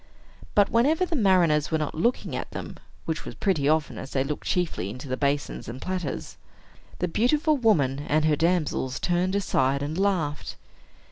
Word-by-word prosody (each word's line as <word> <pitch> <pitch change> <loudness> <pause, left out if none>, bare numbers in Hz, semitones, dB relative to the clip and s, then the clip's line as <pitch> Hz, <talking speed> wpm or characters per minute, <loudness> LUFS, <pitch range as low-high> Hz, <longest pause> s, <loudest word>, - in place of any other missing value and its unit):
But 205 -1 +4
whenever 295 +10 +3
the 345 -2 -3
mariners 180 - +3
were 160 - +1
not 150 -2 -3
looking 235 +11 0
at - - -4
them - - -7 0.3
(which 160 0 -3
was - - -8
pretty 155 -8 +1
often, 155 -1 0
as - - -7
they 135 -2 0
looked 145 +2 -5
chiefly 170 - -1
into 125 +7 -8
the 130 - -1
basins 140 -1 -2
and 125 +2 -7
platters), 180 -3 -4 0.6
the 180 - -1
beautiful 295 - +2
woman 155 - +2
and 155 +1 +2
her 155 -1 +3
damsels 155 -5 0
turned 180 +2 0
aside, 140 -8 +1
and 150 +2 -3
laughed. 175 -7 -1
160 Hz, 175 wpm, -26 LUFS, 145-195 Hz, 0.6 s, But